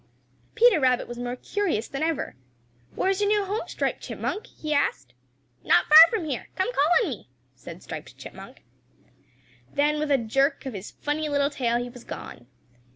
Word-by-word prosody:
Peter 460 Hz, -6 st, +5 dB
Rabbit 255 Hz, -3 st, +2 dB
was 240 Hz, 0 st, -8 dB
more 245 Hz, 0 st, -3 dB
curious 335 Hz, -, -2 dB
than 275 Hz, -, -6 dB
ever. 320 Hz, -, -2 dB, 0.6 s
"Where 380 Hz, -, +1 dB
is 390 Hz, +1 st, -2 dB
your 410 Hz, -, +2 dB
new 415 Hz, -1 st, +2 dB
home, 410 Hz, +3 st, -3 dB
Striped -, -, -2 dB
Chipmunk?" 420 Hz, -, -4 dB
he 305 Hz, -1 st, -5 dB
asked. 135 Hz, -, -1 dB, 0.5 s
"Not -, -, +4 dB
far 315 Hz, +2 st, +10 dB
from 430 Hz, -8 st, -2 dB
here; 280 Hz, -5 st, -4 dB
come 380 Hz, +7 st, -1 dB
call 295 Hz, -5 st, +2 dB
on 385 Hz, -, -2 dB
me," 220 Hz, -, -9 dB, 0.2 s
said 130 Hz, -, -11 dB
Striped -, -, -9 dB
Chipmunk. -, -, -12 dB, 1.1 s
Then 300 Hz, +1 st, +1 dB
with 305 Hz, 0 st, -2 dB
a 280 Hz, -, +4 dB
jerk 270 Hz, +6 st, 0 dB
of 265 Hz, -, -5 dB
his 200 Hz, 0 st, -7 dB
funny 300 Hz, +1 st, -3 dB
little 285 Hz, 0 st, +1 dB
tail 240 Hz, -4 st, 0 dB
he 245 Hz, 0 st, -4 dB
was 245 Hz, -1 st, -13 dB
gone. 120 Hz, -, -9 dB
290 Hz, 180 wpm, -25 LUFS, 245-335 Hz, 1.1 s, far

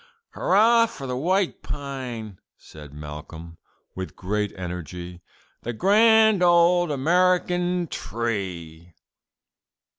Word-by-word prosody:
'" 465 Hz, -, -54 dB
"Hurrah 230 Hz, +4 st, +4 dB
for 225 Hz, -12 st, -9 dB
the 125 Hz, -1 st, -3 dB
white 185 Hz, +7 st, 0 dB
pine," 125 Hz, -8 st, -6 dB, 0.2 s
said 75 Hz, -2 st, -13 dB
Malcolm, 75 Hz, +3 st, -10 dB, 0.3 s
with 95 Hz, 0 st, -7 dB
great 105 Hz, +2 st, -2 dB
energy, 90 Hz, 0 st, -7 dB, 0.4 s
"the 120 Hz, -, -4 dB
grand 220 Hz, -, +4 dB
old 175 Hz, 0 st, +4 dB
American 180 Hz, +4 st, +1 dB
tree!" 90 Hz, -, -5 dB
130 Hz, 95 wpm, -24 LUFS, -, 0.4 s, Hurrah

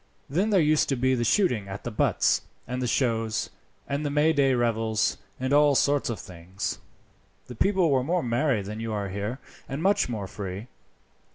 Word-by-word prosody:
Then 185 Hz, +10 st, 0 dB
there 200 Hz, -3 st, +4 dB
used 155 Hz, -1 st, +3 dB
to 135 Hz, -, +2 dB
be 130 Hz, +1 st, +2 dB
the 120 Hz, -2 st, 0 dB
shooting 120 Hz, -, +2 dB
at 95 Hz, +1 st, -7 dB
the 120 Hz, -, -4 dB
butts, 105 Hz, -, +2 dB, 0.3 s
and 125 Hz, +1 st, -3 dB
the 125 Hz, -, 0 dB
shows, 115 Hz, -3 st, 0 dB, 0.4 s
and 140 Hz, +2 st, -2 dB
the 145 Hz, -, -1 dB
Mayday 145 Hz, -2 st, +3 dB
revels, 115 Hz, -2 st, 0 dB, 0.2 s
and 130 Hz, +2 st, -1 dB
all 145 Hz, -1 st, +5 dB
sorts 145 Hz, 0 st, +2 dB
of 115 Hz, -, -3 dB
things. 90 Hz, +2 st, -6 dB, 0.7 s
The 125 Hz, -, -9 dB
people 185 Hz, -, +2 dB
were 130 Hz, -2 st, +2 dB
more 175 Hz, +6 st, 0 dB
merry 120 Hz, -2 st, +1 dB
than 105 Hz, +3 st, -6 dB
you 115 Hz, 0 st, -4 dB
are 100 Hz, -2 st, -2 dB
here, 100 Hz, +6 st, -3 dB, 0.3 s
and 135 Hz, +4 st, -4 dB
much 195 Hz, -8 st, +2 dB
more 110 Hz, -5 st, -3 dB
free. 95 Hz, +4 st, -7 dB
125 Hz, 185 wpm, -26 LUFS, 110-145 Hz, 0.7 s, all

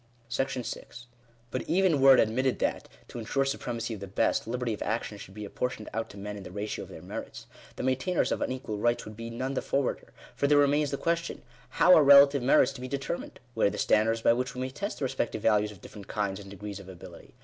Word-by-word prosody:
§6. 125 Hz, -2 st, -4 dB, 0.5 s
But 130 Hz, -, -2 dB
even 175 Hz, -5 st, +3 dB
were 135 Hz, 0 st, +9 dB
it -, -, +3 dB
admitted 125 Hz, +4 st, +2 dB
that, -, -, -2 dB, 0.2 s
to 120 Hz, -, -8 dB
ensure 135 Hz, +5 st, 0 dB
supremacy 120 Hz, -3 st, -3 dB
of 105 Hz, -, -7 dB
the 100 Hz, -, -7 dB
best, 95 Hz, -, 0 dB
liberty 125 Hz, 0 st, -2 dB
of -, -, -7 dB
action 110 Hz, -2 st, -3 dB
should 100 Hz, -1 st, -11 dB
be 105 Hz, -1 st, -6 dB
apportioned 115 Hz, +1 st, -4 dB
out 115 Hz, +1 st, -3 dB
to 100 Hz, -, -12 dB
men 105 Hz, +1 st, -6 dB
in -, -, -8 dB
the -, -, -9 dB
ratio 105 Hz, +3 st, -4 dB
of -, -, -17 dB
their -, -, -10 dB
merits, -, -, -7 dB, 0.3 s
the -, -, -5 dB
maintainors 130 Hz, +7 st, +1 dB
of -, -, -1 dB
unequal 125 Hz, -5 st, -3 dB
rights 120 Hz, +2 st, +1 dB
would 110 Hz, -, -9 dB
be 115 Hz, +1 st, -7 dB
none 130 Hz, +4 st, -3 dB
the -, -, -1 dB
forwarder; 140 Hz, -1 st, -2 dB, 0.2 s
for 140 Hz, -, +1 dB
there 145 Hz, 0 st, +5 dB
remains 145 Hz, +1 st, +3 dB
the 140 Hz, -, -2 dB
question 170 Hz, +2 st, -2 dB, 0.2 s
— 125 Hz, 0 st, -27 dB
how 180 Hz, -, +8 dB
are 155 Hz, -, +7 dB
relative 140 Hz, 0 st, +8 dB
merits 125 Hz, 0 st, +4 dB
to -, -, -10 dB
be 130 Hz, -, -5 dB
determined? 140 Hz, +5 st, -4 dB
Where 110 Hz, -, +3 dB
are -, -, +2 dB
the -, -, -6 dB
standards 115 Hz, +1 st, +2 dB
by -, -, +6 dB
which 125 Hz, +2 st, -3 dB
we 125 Hz, -, -4 dB
may 130 Hz, -, -2 dB
test 200 Hz, +10 st, -4 dB
the 140 Hz, -, -2 dB
respective 120 Hz, -4 st, -2 dB
values 105 Hz, -1 st, +3 dB
of 100 Hz, -, -14 dB
different 100 Hz, -3 st, -11 dB
kinds 100 Hz, -2 st, -2 dB
and 100 Hz, -1 st, -11 dB
degrees 100 Hz, 0 st, -7 dB
of 95 Hz, -1 st, -12 dB
ability 90 Hz, -2 st, -12 dB
120 Hz, 240 wpm, -28 LUFS, 105-135 Hz, 0.5 s, were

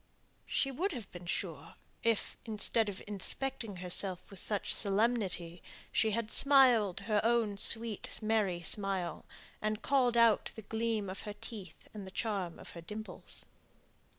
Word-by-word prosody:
She 275 Hz, -, 0 dB
would 350 Hz, +8 st, -1 dB
have 230 Hz, -7 st, -7 dB
been 175 Hz, -1 st, -10 dB
sure, 165 Hz, -4 st, -4 dB, 0.3 s
if, 230 Hz, -2 st, 0 dB
instead 220 Hz, 0 st, 0 dB
of 200 Hz, -, -7 dB
inspecting 210 Hz, +2 st, -1 dB
herself 180 Hz, +1 st, 0 dB
with 195 Hz, -, -6 dB
such 205 Hz, -2 st, 0 dB
solemnity, 195 Hz, -5 st, +1 dB, 0.3 s
she 220 Hz, -, +2 dB
had 220 Hz, +1 st, -2 dB
smiled 250 Hz, -9 st, +5 dB
her 210 Hz, -2 st, +1 dB
own 225 Hz, -3 st, +2 dB
sweet 225 Hz, -1 st, +3 dB
merry 210 Hz, -5 st, 0 dB
smile, 195 Hz, -1 st, +1 dB, 0.4 s
and 215 Hz, 0 st, -2 dB
called 250 Hz, -4 st, +3 dB
out 230 Hz, -2 st, +4 dB
the 220 Hz, -, -8 dB
gleam 220 Hz, -1 st, -1 dB
of 185 Hz, +1 st, -6 dB
her 210 Hz, -, -6 dB
teeth, 195 Hz, -8 st, -9 dB
and 205 Hz, -3 st, -7 dB
the -, -, -7 dB
charm 190 Hz, -4 st, -2 dB
of -, -, -11 dB
her 170 Hz, -, -9 dB
dimples. 210 Hz, +5 st, -6 dB
210 Hz, 150 wpm, -33 LUFS, 190-230 Hz, 0.4 s, smiled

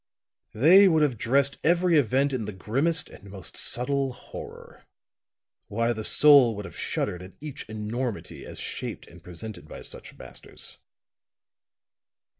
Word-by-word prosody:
They 180 Hz, -, +7 dB
would 160 Hz, -4 st, +4 dB
have 140 Hz, -5 st, +1 dB
dressed 140 Hz, +4 st, +2 dB
every 175 Hz, +1 st, +3 dB
event 140 Hz, 0 st, +2 dB
in 120 Hz, -4 st, -2 dB
the 105 Hz, -, -4 dB
grimmest 135 Hz, -, 0 dB
and 100 Hz, -, -14 dB
most 95 Hz, -3 st, -9 dB
subtle 135 Hz, +1 st, +1 dB
horror; 125 Hz, -, -11 dB, 0.8 s
why, 115 Hz, +3 st, 0 dB
the 110 Hz, -1 st, -5 dB
soul 140 Hz, -3 st, +6 dB
would 105 Hz, 0 st, -6 dB
have -, -, -10 dB
shuddered 90 Hz, -, -2 dB
at 90 Hz, +1 st, -11 dB
each 145 Hz, -6 st, -8 dB
enormity 110 Hz, +2 st, -4 dB
as -, -, -7 dB
shaped -, -, -5 dB
and -, -, -16 dB
presented 90 Hz, -1 st, -9 dB
by -, -, -9 dB
such -, -, -9 dB
masters." -, -, -9 dB
125 Hz, 140 wpm, -26 LUFS, 105-145 Hz, 0.8 s, They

